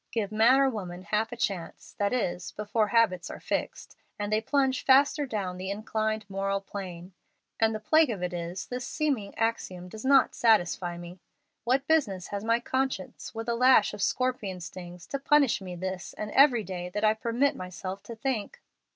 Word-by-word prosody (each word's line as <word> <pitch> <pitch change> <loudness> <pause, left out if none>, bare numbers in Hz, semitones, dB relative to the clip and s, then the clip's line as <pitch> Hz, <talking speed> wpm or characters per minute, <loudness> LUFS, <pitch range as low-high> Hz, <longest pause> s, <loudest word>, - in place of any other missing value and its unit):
Give 215 -3 -2
man 225 +5 +5
or 275 - +5
woman 185 -7 -5
half 215 +4 -1
a - - -5
chance, 195 -7 -4
that 205 0 +1
is, 180 -8 -2
before 210 +1 0
habits 200 -5 +2
are - - -7
fixed, - - -4 0.2
and 205 0 -2
they 215 - +2
plunge 265 +1 +1
faster 280 +2 +4
down 195 -6 -3
the 185 +1 -5
inclined 215 +1 -2
moral 195 0 -1
plane. 185 -2 -8 0.5
And 225 0 +3
the - - -3
plague 310 +7 +4
of 200 -6 -3
it 180 0 -2
is, 175 +2 -4
this 250 0 -5
seeming 275 -10 -2
axiom 185 -6 -2
does 215 +3 -9
not 270 0 +5
satisfy 175 -6 +2
me. 175 +1 -10 0.5
What 260 +3 +2
business 210 - +1
has 200 0 -4
my 230 +1 +2
conscience, 260 -5 -3
with 225 +1 -5
a 235 - +1
lash 250 -3 +5
of 205 - -6
scorpion 220 -6 -1
stings, 175 0 -9
to 275 - -4
punish 280 -5 +3
me 180 -2 -6
this 185 +1 -5
and 210 0 -5
every 260 -4 +5
day 180 -1 -5
that 210 +4 -4
I 215 0 +5
permit 235 +5 0
myself 185 +1 -6
to 230 - -7
think? 250 - -3
215 Hz, 185 wpm, -28 LUFS, 185-245 Hz, 0.5 s, man